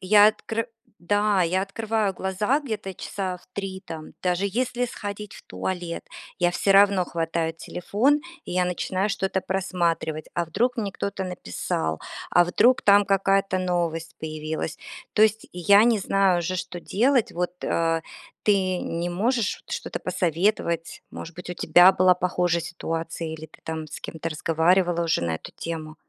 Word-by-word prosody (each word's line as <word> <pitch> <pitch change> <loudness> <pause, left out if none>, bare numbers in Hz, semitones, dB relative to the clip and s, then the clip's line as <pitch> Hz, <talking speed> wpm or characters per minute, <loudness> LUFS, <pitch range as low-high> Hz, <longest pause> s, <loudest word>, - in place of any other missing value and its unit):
я 205 +2 +7
откры 225 +1 -1 0.3
да, 205 +2 +2
я 180 +2 +1
открываю 210 0 -1
глаза 205 +10 0
где-то 215 -8 -5
часа 185 0 -4
в 175 - -22
3 195 -3 -5
там, 160 -3 -8
даже 180 +1 +1
если 245 +4 -1
сходить 205 -2 -6
в - - -12
туалет, 170 - -4 0.3
я 175 -1 +3
всё 195 +2 +2
равно 200 -2 +5
хватаю 165 -1 -1
телефон, 215 - 0 0.2
и - - -6
я 180 0 +2
начинаю 185 +3 -1
что-то 190 -1 -1
просматривать. 175 -4 -1
А 175 - 0
вдруг 245 +10 0
мне 205 -4 -2
кто-то 200 -1 -3
написал? 90 - -3 0.3
А 175 - +5
вдруг 225 +8 +4
там 205 0 +6
какая-то 195 -1 +2
новость 170 -3 -1
появилась? 155 0 -4 0.3
То 215 - +4
есть 220 0 +3
я 200 +4 +5
не 235 -2 +4
знаю 195 -2 +2
уже, 175 +2 -2
что 175 0 -5
делать. 245 +6 +2
Вот, 175 +1 -2
э, 165 0 +1 0.4
ты 190 -3 +2
не 170 +1 -3
можешь 225 +4 0
вот - - -17
что-то - - -4
посоветовать, 175 -1 -1
может 165 - -8
быть, 180 +1 -8
у - - -4
тебя 180 +1 +6
была 185 -1 +5
похожая 180 -1 0
ситуация 165 -1 -4
или 160 0 -7
ты 155 - -20
там 160 -1 -4
с - - -8
кем-то 165 0 -5
разговаривала 170 +3 +2
уже 165 - +1
на 85 -1 0
эту 80 - -8
тему. 160 -2 -6
185 Hz, 160 wpm, -25 LUFS, 165-200 Hz, 0.4 s, я